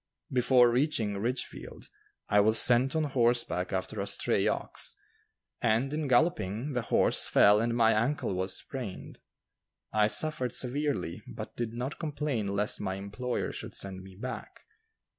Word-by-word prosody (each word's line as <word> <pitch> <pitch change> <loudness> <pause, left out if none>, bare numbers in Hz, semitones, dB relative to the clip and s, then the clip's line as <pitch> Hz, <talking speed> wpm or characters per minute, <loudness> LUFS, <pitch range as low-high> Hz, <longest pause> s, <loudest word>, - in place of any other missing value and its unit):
Before 125 -1 +4
reaching 120 -5 0
Ridgefield, 125 +4 -5 0.4
I 105 - +3
was 110 +2 +5
sent 125 +5 +6
on 160 - +1
horseback 120 -9 0
after 95 -1 -3
a - - -3
stray - - 0
ox, - - -1 0.7
and, 120 +5 +1
in 155 -1 -2
galloping, 130 - +1
the 125 - 0
horse - - +1
fell 105 +1 +5
and 115 0 0
my 115 -1 +5
ankle 115 0 0
was 95 +1 -2
sprained. 125 -9 -7 0.7
I 105 -1 +4
suffered 130 0 0
severely, 135 - -2
but - - -8
did 115 -1 -4
not 125 +4 -5
complain 150 -8 -2
lest 100 +1 -1
my 95 -2 -2
employer 105 +6 -4
should - - -8
send 95 -1 -6
me 95 0 -13
back. 130 +6 -7
120 Hz, 145 wpm, -29 LUFS, 105-135 Hz, 0.7 s, sent